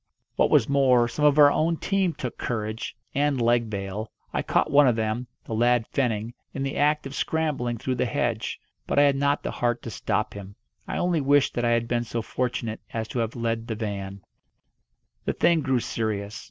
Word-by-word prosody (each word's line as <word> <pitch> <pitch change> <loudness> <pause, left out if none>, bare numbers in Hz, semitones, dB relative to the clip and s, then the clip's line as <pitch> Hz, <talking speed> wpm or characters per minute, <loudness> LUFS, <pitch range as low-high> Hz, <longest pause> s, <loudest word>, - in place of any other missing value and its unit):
What - - +3
was - - +4
more, 130 -4 +4
some 150 +5 -1
of 145 0 +5
our 145 -1 +8
own 165 +2 +1
team 195 -2 0
took 125 -5 -6
courage, 110 -1 -3 0.2
and 145 -1 +1
leg 120 -1 +2
bail. 100 +1 -4 0.2
I - - 0
caught - - +1
one 145 -1 +6
of 120 - +3
them 110 +2 -2 0.2
the - - -5
lad 120 +1 +3
Fenning 115 -4 0 0.2
in 135 - -2
the 135 - -3
act 150 +1 +2
of 135 - -6
scrambling 140 -7 -1
through 130 +4 -2
the 125 0 0
hedge. 115 -1 -2 0.3
But - - -1
I 145 - +7
had 140 -1 +4
not 140 +1 +1
the - - -2
heart 120 -1 -1
to 115 - -6
stop - - -1
him. 100 -1 -9 0.3
I - - -3
only 175 -3 +1
wished 140 0 +3
that 120 - -1
I - - +3
had 115 0 0
been 120 0 0
so 115 0 -4
fortunate 120 -2 -3
as 110 -1 -3
to 125 - -3
have 115 -1 -2
led 115 -1 -2
the 110 - -3
van. 100 -3 -5 1.0
The - - 0
thing 170 -2 +3
grew 130 -3 +1
serious. 105 -2 -3
120 Hz, 205 wpm, -25 LUFS, 110-140 Hz, 1.0 s, our